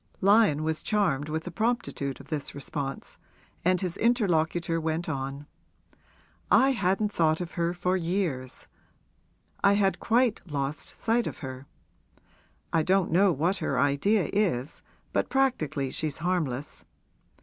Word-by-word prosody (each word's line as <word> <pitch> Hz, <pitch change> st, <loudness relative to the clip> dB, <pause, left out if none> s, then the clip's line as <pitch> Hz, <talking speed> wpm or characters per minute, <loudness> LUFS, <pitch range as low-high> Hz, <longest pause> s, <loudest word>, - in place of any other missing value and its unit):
Lyon 200 Hz, -6 st, +4 dB
was 160 Hz, 0 st, -1 dB
charmed 155 Hz, -9 st, 0 dB
with 160 Hz, +1 st, -2 dB
the 180 Hz, -, -6 dB
promptitude 215 Hz, -, -2 dB
of -, -, -14 dB
this 150 Hz, -4 st, -3 dB
response, 140 Hz, -1 st, -5 dB, 0.4 s
and 185 Hz, +1 st, +3 dB
his 185 Hz, -1 st, -2 dB
interlocutor 170 Hz, -7 st, +1 dB
went 160 Hz, +2 st, -2 dB
on: 135 Hz, -1 st, -4 dB, 1.0 s
'I 270 Hz, +1 st, +5 dB
hadn't 205 Hz, -2 st, 0 dB
thought 160 Hz, -1 st, +2 dB
of 175 Hz, -1 st, -5 dB
her 170 Hz, 0 st, 0 dB
for 180 Hz, +1 st, 0 dB
years 170 Hz, -8 st, -2 dB, 1.0 s
I 200 Hz, 0 st, +6 dB
had 200 Hz, -1 st, +2 dB
quite 235 Hz, -1 st, +2 dB
lost 145 Hz, -1 st, -3 dB
sight 230 Hz, +1 st, +1 dB
of -, -, -5 dB
her. 130 Hz, +1 st, -8 dB, 1.1 s
I 165 Hz, -, +4 dB
don't 185 Hz, +2 st, +2 dB
know 190 Hz, +3 st, +5 dB
what 170 Hz, +6 st, 0 dB
her 135 Hz, -, -2 dB
idea 145 Hz, +9 st, +2 dB
is, 165 Hz, -9 st, 0 dB, 0.3 s
but -, -, 0 dB
practically 155 Hz, -, 0 dB
she's 155 Hz, -3 st, -2 dB
harmless. 155 Hz, -6 st, -2 dB
170 Hz, 135 wpm, -27 LUFS, 145-200 Hz, 1.1 s, I